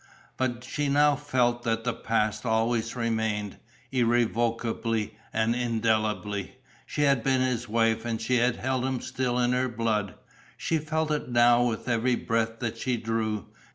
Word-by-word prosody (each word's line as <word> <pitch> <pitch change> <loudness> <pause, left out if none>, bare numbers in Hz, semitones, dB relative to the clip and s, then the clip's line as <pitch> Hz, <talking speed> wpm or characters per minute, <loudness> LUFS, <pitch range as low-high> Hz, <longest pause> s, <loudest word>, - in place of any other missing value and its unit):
But 125 -2 -2
she 145 +1 -2
now 145 +1 +4
felt 125 -4 +1
that 115 -1 -1
the 125 0 0
past 110 -1 -1
always 115 0 0
remained, 110 -3 -1 0.3
irrevocably 115 -2 0 0.2
and 110 +1 +1
indelibly. 110 -4 -1 0.3
She 150 - -1
had 140 -4 +3
been 130 +1 +2
his 125 -3 -1
wife 115 0 +2
and 115 -2 -2
she 125 +2 +1
held 125 +1 +1
him 130 -1 -1
still 130 -1 -2
in 125 0 +2
her 125 +1 +1
blood. 110 -4 -1 0.4
She 160 - 0
felt 155 0 -1
it 150 -4 -2
now 120 0 +5
with 115 0 -3
every 120 +1 +2
breath 115 -1 -1
that 115 -1 -3
she 125 0 0
drew. 110 -2 -2
120 Hz, 155 wpm, -27 LUFS, 110-125 Hz, 0.4 s, now